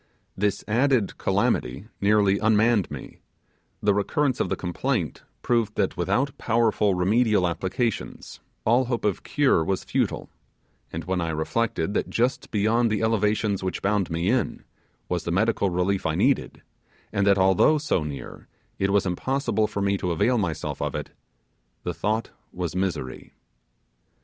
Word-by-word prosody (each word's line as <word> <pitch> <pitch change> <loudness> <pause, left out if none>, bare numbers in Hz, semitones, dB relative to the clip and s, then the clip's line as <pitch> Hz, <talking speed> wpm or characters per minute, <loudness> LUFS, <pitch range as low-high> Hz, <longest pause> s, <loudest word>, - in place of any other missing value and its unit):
This 100 0 0
added 120 -1 +1
calamity 65 +11 0
nearly 100 -1 +3
unmanned 110 -1 +3
me; - - -9 0.6
the 105 0 +4
recurrence 130 +6 0
of - - 0
the - - 0
complaint 90 - -2 0.2
proved 115 -3 +1
that - - 0
without 110 +11 0
powerful 110 -4 +2
remedial 105 +1 +3
applications 95 +6 -3 0.3
all 120 +4 +4
hope 120 -2 -2
of 100 -3 0
cure 140 - +2
was 95 +3 -1
futile; - - -1 0.6
and 80 - -4
when 90 +2 -1
I 85 - -1
reflected 80 +4 -1
that - - -1
just 125 +3 0
beyond 115 +3 +2
the 110 0 0
elevations, 105 -2 +1
which 95 -1 -3
bound 100 -2 +1
me 85 +3 -1
in, 125 -4 -1 0.4
was 90 -1 -2
the 85 - -3
medical 100 +1 +2
relief 90 +2 0
I - - 0
needed, - - +1 0.5
and 100 0 +1
that 100 -1 +5
although 95 - +4
so 145 - 0
near, 70 -2 -8 0.3
it 95 - +1
was 100 0 +2
impossible 110 +3 0
for 100 - -3
me 100 0 +1
to 90 - -2
avail 120 +9 +2
myself 85 -7 -3
of - - -2
it, - - -5 0.7
the - - -2
thought 110 +3 -1 0.2
was 90 -1 -4
misery. 90 -9 -3
100 Hz, 150 wpm, -25 LUFS, 90-115 Hz, 0.7 s, that